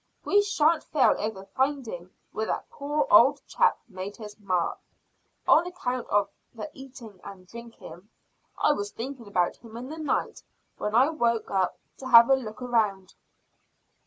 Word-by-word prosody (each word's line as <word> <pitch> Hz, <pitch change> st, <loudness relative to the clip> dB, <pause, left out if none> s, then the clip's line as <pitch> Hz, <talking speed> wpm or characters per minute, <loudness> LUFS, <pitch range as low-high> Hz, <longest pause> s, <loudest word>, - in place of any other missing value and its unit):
We 410 Hz, -, +4 dB
shan't 330 Hz, -5 st, +2 dB
fail 280 Hz, -4 st, +3 dB
over 210 Hz, -3 st, -4 dB
finding 260 Hz, -10 st, -2 dB, 0.2 s
where 220 Hz, 0 st, -3 dB
that -, -, -4 dB
poor 290 Hz, +5 st, -1 dB
old -, -, +6 dB
chap -, -, +2 dB
made 185 Hz, +2 st, -7 dB
his 210 Hz, -1 st, -10 dB
map, 185 Hz, -4 st, -1 dB, 0.7 s
on 340 Hz, +3 st, +5 dB
account 255 Hz, -9 st, -4 dB
of 205 Hz, 0 st, +2 dB, 0.3 s
the 265 Hz, +7 st, -7 dB
eating 255 Hz, -7 st, -12 dB
and 190 Hz, -2 st, -11 dB
drinking. 225 Hz, -2 st, -12 dB, 0.5 s
I -, -, +3 dB
was 205 Hz, -8 st, -2 dB
thinking 245 Hz, 0 st, -7 dB
about 180 Hz, -3 st, 0 dB
him 230 Hz, -1 st, -12 dB
in 250 Hz, +3 st, -7 dB
the 315 Hz, +1 st, -7 dB
night 310 Hz, -, -2 dB, 0.4 s
when 210 Hz, +1 st, -2 dB
I 260 Hz, +5 st, +5 dB
woke 235 Hz, -7 st, 0 dB
up 190 Hz, -2 st, 0 dB, 0.2 s
to 260 Hz, -, -7 dB
have 235 Hz, 0 st, +8 dB
a -, -, +7 dB
look 230 Hz, -3 st, -7 dB
round." 215 Hz, -6 st, -1 dB
235 Hz, 160 wpm, -26 LUFS, 205-270 Hz, 0.7 s, have